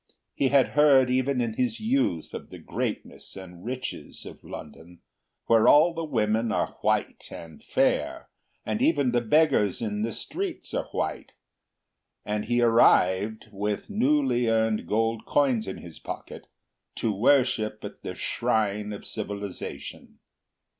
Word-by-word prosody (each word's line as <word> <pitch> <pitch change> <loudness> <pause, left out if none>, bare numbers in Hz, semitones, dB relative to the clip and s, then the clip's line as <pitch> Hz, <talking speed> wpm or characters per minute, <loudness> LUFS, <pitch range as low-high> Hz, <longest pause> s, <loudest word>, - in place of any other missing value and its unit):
He 135 - +1
had 135 0 +4
heard 135 -4 +5
even 130 0 +1
in 115 -2 -1
his 120 -1 -1
youth 220 - 0
of - - -7
the - - -10
greatness - - -5
and 90 -2 -11
riches 130 +2 -6
of - - -11
London, 80 +3 -11 0.4
where 115 -1 +4
all 160 +4 +6
the 165 0 -4
women 110 -5 0
are - - -1
white - - -1
and 80 -2 -11
fair, - - 0 0.4
and 110 -1 -2
even 145 -6 +3
the 120 0 +2
beggars 120 - +3
in 105 -2 -3
the 115 +2 -1
streets 365 - -5
are - - -1
white, - - -4 0.9
and 105 0 -2
he 120 +1 +1
arrived, 110 -2 +3
with 105 - -3
newly 250 - +2
earned 110 -1 +1
gold 115 +1 0
coins 130 -6 +2
in 95 - -5
his 85 -2 -11
pocket, - - -8 0.5
to 110 - -1
worship 110 -1 +2
at - - -9
the - - -6
shrine 105 -1 -1
of 100 - -9
civilisation. 100 -2 -7
115 Hz, 140 wpm, -26 LUFS, 105-135 Hz, 0.9 s, all